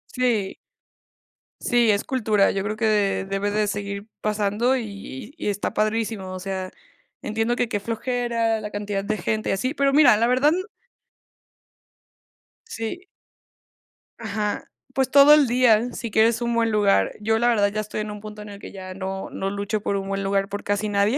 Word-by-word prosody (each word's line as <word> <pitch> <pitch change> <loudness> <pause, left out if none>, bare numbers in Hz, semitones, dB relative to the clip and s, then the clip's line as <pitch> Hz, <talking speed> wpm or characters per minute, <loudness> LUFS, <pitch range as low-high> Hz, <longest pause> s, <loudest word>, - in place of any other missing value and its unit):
Sí. 235 -6 0 1.1
Sí, 240 -2 +3
es 200 0 +1
cultura, 215 -6 +2
yo 195 - -2
creo 210 +2 -2
que 210 -3 +1
debe 195 +1 -1
de 210 0 +1
seguir 200 0 -4
pasando 215 +4 +1
y 210 - -7
y - - -4
está 205 -1 -2
padrísimo. 215 -3 -1
O 185 - -5
sea, 190 0 -4 0.5
entiendo 225 +3 -1
que 245 -1 -1
qué 205 - -1
flojera 230 0 -1
la 210 - -5
cantidad 205 -1 -3
de 215 +1 -2
gente 215 +4 -2
y - - +2
así, 255 +8 -1
pero 275 -2 +1
mira, 285 -8 +7
la 230 - +2
verdad 260 +5 +4 2.2
Sí. 350 - -5 1.1
Ajá. 210 -2 -3 0.2
Pues, 265 -1 +1
todo 280 +2 +8
el 300 -3 +5
día 240 -1 +3
si 230 -2 -5
quieres 225 +2 +3
un 235 0 0
buen 230 -1 +2
lugar. 205 -2 +3
Yo, 220 +1 +1
la 240 - +2
verdad, 210 -4 +3
ya 215 +1 -2
estoy 215 0 -4
en 210 - -5
un 210 0 -8
punto 210 0 -9
en 210 - -10
el 200 0 -10
que - - -10
ya 185 -1 -8
no 190 0 -5
no 195 - -3
lucho 205 +1 -2
por 200 - -1
un 195 0 -3
buen 195 0 -2
lugar 195 0 +1
por 205 +1 -5
casi 205 +1 -1
nadie, 205 +5 +2
215 Hz, 180 wpm, -23 LUFS, 200-235 Hz, 2.2 s, todo